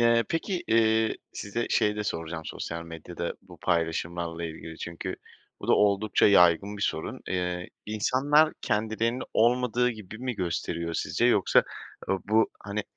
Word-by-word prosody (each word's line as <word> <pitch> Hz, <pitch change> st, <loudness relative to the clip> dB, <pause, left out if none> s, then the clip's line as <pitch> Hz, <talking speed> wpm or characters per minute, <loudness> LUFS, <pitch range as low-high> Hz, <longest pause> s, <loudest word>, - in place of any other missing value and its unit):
Eee, 115 Hz, -1 st, +4 dB
peki, 175 Hz, +2 st, -1 dB
eee, 110 Hz, 0 st, +3 dB, 0.2 s
size 110 Hz, +4 st, -3 dB
şey 105 Hz, 0 st, +2 dB
de 105 Hz, -, -2 dB
soracağım 80 Hz, -3 st, -4 dB
sosyal 85 Hz, 0 st, -5 dB
medyada 85 Hz, +1 st, -6 dB
bu 90 Hz, -1 st, -14 dB
paylaşımlarla 85 Hz, 0 st, -1 dB
ilgili 80 Hz, 0 st, -7 dB
çünkü 85 Hz, -1 st, -5 dB, 0.4 s
bu -, -, -7 dB
da -, -, +6 dB
oldukça 105 Hz, +1 st, +3 dB
yaygın 100 Hz, +1 st, +5 dB
bir 100 Hz, -, -5 dB
sorun. 80 Hz, -, -2 dB
Eee, 90 Hz, -1 st, -2 dB, 0.2 s
insanlar 140 Hz, +9 st, +3 dB
kendilerini 110 Hz, +2 st, 0 dB
olmadığı 125 Hz, +1 st, +3 dB
gibi 110 Hz, -2 st, -9 dB
mi 125 Hz, 0 st, -3 dB
gösteriyor 85 Hz, -2 st, -2 dB
sizce -, -, 0 dB
yoksa, -, -, +4 dB, 0.5 s
ııı, 95 Hz, -, +1 dB
bu, 110 Hz, +2 st, +3 dB
hani, 105 Hz, +1 st, -2 dB
105 Hz, 145 wpm, -27 LUFS, 85-115 Hz, 0.5 s, da